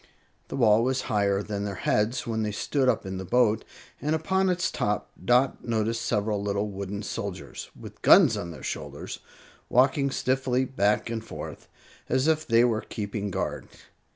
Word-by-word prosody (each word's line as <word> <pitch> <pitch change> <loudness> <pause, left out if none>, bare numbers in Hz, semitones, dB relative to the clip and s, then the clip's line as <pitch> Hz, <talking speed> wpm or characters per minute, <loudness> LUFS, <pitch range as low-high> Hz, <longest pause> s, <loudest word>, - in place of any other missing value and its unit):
The - - -5
wall 115 -3 +4
was 130 +1 +1
higher 100 -1 +1
than 100 -1 -3
their 100 -1 -3
heads 115 +6 0
when 110 -1 -1
they 105 -1 -1
stood 130 +5 +1
up 115 -4 0
in 95 0 -4
the - - -4
boat, 110 +2 +2 0.4
and 150 +2 +1
upon 190 +4 +1
its 180 -1 0
top 105 0 -1
Dot 125 +2 +3
noticed 115 0 -1
several 105 -2 0
little 100 +1 -1
wooden 100 +1 -5
soldiers, - - -6
with - - -11
guns - - +7
on 85 - -4
their 80 - -10
shoulders, - - -5 0.5
walking 135 +3 +3
stiffly 130 -1 0
back 105 -3 +1
and 115 -1 -3
forth, - - -8 0.4
as 130 +3 +2
if 155 -1 +1
they 115 0 +5
were 115 -3 +2
keeping 105 -2 -4
guard. 95 - -3
115 Hz, 170 wpm, -27 LUFS, 105-130 Hz, 0.5 s, guns